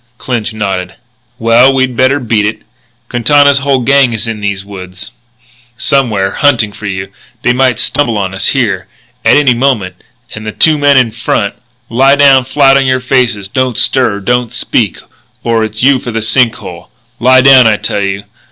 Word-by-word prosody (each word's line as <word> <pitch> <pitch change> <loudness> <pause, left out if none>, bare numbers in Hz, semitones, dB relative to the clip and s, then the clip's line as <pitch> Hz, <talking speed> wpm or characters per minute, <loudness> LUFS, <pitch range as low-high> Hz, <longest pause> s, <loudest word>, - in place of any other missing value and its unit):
Clinch 115 -3 -4
nodded. 95 -4 -4 0.4
"Well, 115 +3 +4
we'd 130 -2 0
better 130 +3 +2
beat 115 -4 -1
it. 110 - -5 0.4
Quintana's 140 +4 +3
whole 135 -2 0
gang 135 0 +2
is 110 - -4
in 110 -2 -5
these 100 -1 -3
woods, 95 0 -10 0.7
somewhere, 125 -8 0
hunting 120 -7 +1
for 105 - -8
you, 95 -1 -4
and 95 +1 -17 0.3
they 125 - +2
might 125 -2 0
stumble 120 -4 0
on 95 -2 -3
us 95 - -2
here, - - -1 0.4
at - - +4
any 140 -4 +3
moment." 115 -8 -1 0.4
And, 110 - -8
to - - -4
the - - -24
two 155 -2 +3
men 145 -1 +3
in 125 -3 +2
front: 110 -3 -2 0.3
"Lie 135 +4 +3
down 135 -3 +4
flat 135 0 +3
on 135 -1 0
your 130 0 +1
faces. 125 -6 -1
Don't 130 +2 -2
stir; 120 -6 +1
don't 120 +2 -1
speak; - - -2 0.5
or 115 -1 0
it's 110 +1 -4
you 135 0 +3
for 125 - -7
the 115 -1 -3
sink 115 +1 +1
hole.... - - -11 0.3
Lie 130 +2 +4
down, 130 -2 +6
I 110 -1 +2
tell 100 - -3
you! 100 0 -3
120 Hz, 185 wpm, -10 LUFS, 105-130 Hz, 0.7 s, down